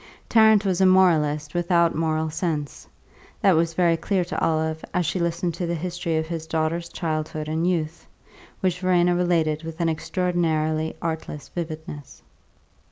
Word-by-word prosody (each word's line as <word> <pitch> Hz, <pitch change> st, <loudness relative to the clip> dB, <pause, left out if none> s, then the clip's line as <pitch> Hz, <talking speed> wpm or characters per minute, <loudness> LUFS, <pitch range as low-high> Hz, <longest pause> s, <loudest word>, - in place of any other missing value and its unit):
Tarrant 220 Hz, -2 st, +5 dB
was 190 Hz, -1 st, +1 dB
a 190 Hz, -, +6 dB
moralist 155 Hz, -5 st, +3 dB
without 175 Hz, -1 st, +2 dB
moral 160 Hz, 0 st, -1 dB
sense 155 Hz, -3 st, -3 dB, 0.5 s
that 195 Hz, -3 st, +4 dB
was 165 Hz, 0 st, +1 dB
very 170 Hz, -2 st, +3 dB
clear 185 Hz, +2 st, -1 dB
to -, -, -4 dB
Olive 160 Hz, 0 st, 0 dB
as 180 Hz, -1 st, +1 dB
she 185 Hz, -, -1 dB
listened 170 Hz, 0 st, -1 dB
to 170 Hz, +1 st, -3 dB
the 170 Hz, -, -1 dB
history 170 Hz, 0 st, -2 dB
of 160 Hz, -, -1 dB
his 160 Hz, -1 st, -5 dB
daughter's 160 Hz, +1 st, -1 dB
childhood 155 Hz, -2 st, -3 dB
and 160 Hz, +3 st, 0 dB
youth, 165 Hz, -2 st, -3 dB, 0.5 s
which 180 Hz, -2 st, 0 dB
Verena 180 Hz, -1 st, +3 dB
related 165 Hz, -4 st, +1 dB
with 165 Hz, 0 st, -8 dB
an 170 Hz, -1 st, +1 dB
extraordinary 160 Hz, -1 st, -1 dB
artless 160 Hz, -3 st, -4 dB
vividness. 160 Hz, -4 st, -7 dB
165 Hz, 155 wpm, -24 LUFS, 155-175 Hz, 0.5 s, a